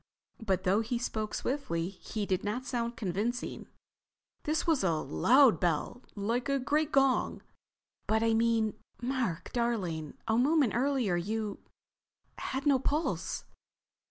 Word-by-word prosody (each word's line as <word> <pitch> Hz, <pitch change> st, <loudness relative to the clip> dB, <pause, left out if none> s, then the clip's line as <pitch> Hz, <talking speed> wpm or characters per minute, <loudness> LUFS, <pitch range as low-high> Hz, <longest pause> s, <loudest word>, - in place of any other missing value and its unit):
But 190 Hz, -3 st, 0 dB
though 195 Hz, +3 st, +3 dB
he 235 Hz, +2 st, -2 dB
spoke 220 Hz, -3 st, -3 dB
swiftly 185 Hz, -11 st, -2 dB
he 205 Hz, +2 st, -5 dB
did 185 Hz, -2 st, 0 dB
not 220 Hz, +5 st, -2 dB
sound 235 Hz, -2 st, -2 dB
convincing. 220 Hz, +4 st, -2 dB, 0.8 s
"This 310 Hz, +1 st, 0 dB
was 320 Hz, -, +2 dB
a 175 Hz, -3 st, +3 dB
loud 210 Hz, -, +4 dB
bell. 175 Hz, +7 st, -1 dB
Like 230 Hz, +6 st, -1 dB
a 275 Hz, -, +2 dB
great 295 Hz, +4 st, 0 dB
gong." 270 Hz, -2 st, +2 dB, 0.6 s
"But—I 220 Hz, +1 st, +2 dB
mean, 225 Hz, -1 st, +2 dB, 0.3 s
Mark 245 Hz, -9 st, -2 dB
darling—a 220 Hz, -, -1 dB
moment 285 Hz, -2 st, +3 dB
earlier 250 Hz, -7 st, +1 dB
you—had 220 Hz, -, -6 dB
no 280 Hz, -3 st, +4 dB
pulse." 295 Hz, +5 st, -1 dB
230 Hz, 120 wpm, -31 LUFS, 200-265 Hz, 0.8 s, loud